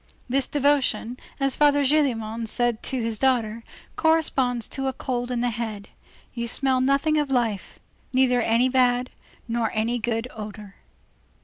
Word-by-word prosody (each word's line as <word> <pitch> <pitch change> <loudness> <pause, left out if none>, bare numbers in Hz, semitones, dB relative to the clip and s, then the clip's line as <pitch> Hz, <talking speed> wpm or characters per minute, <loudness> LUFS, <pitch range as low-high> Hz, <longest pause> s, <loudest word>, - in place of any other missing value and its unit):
This 265 +1 +1
devotion, 270 -5 +1 0.2
as 275 -1 +1
Father 290 -1 +4
Gillenormand 235 -6 0
said 240 0 0
to 260 - -2
his 225 -2 -3
daughter, 235 -4 +1 0.3
corresponds 270 -7 +1
to 270 -1 -3
a 265 - -1
cold 245 -1 -3
in 245 -1 -1
the 245 0 0
head. 220 -3 -5 0.4
You 235 -1 -3
smell 260 +1 +2
nothing 280 +4 +2
of 295 -2 -1
life. 230 -7 -1 0.3
Neither 255 -1 +3
any 230 +2 +3
bad, 250 -1 +2 0.4
nor 230 -1 0
any 230 +3 0
good 225 +1 -2
odor. 210 -2 -9
245 Hz, 145 wpm, -24 LUFS, 230-270 Hz, 0.4 s, Father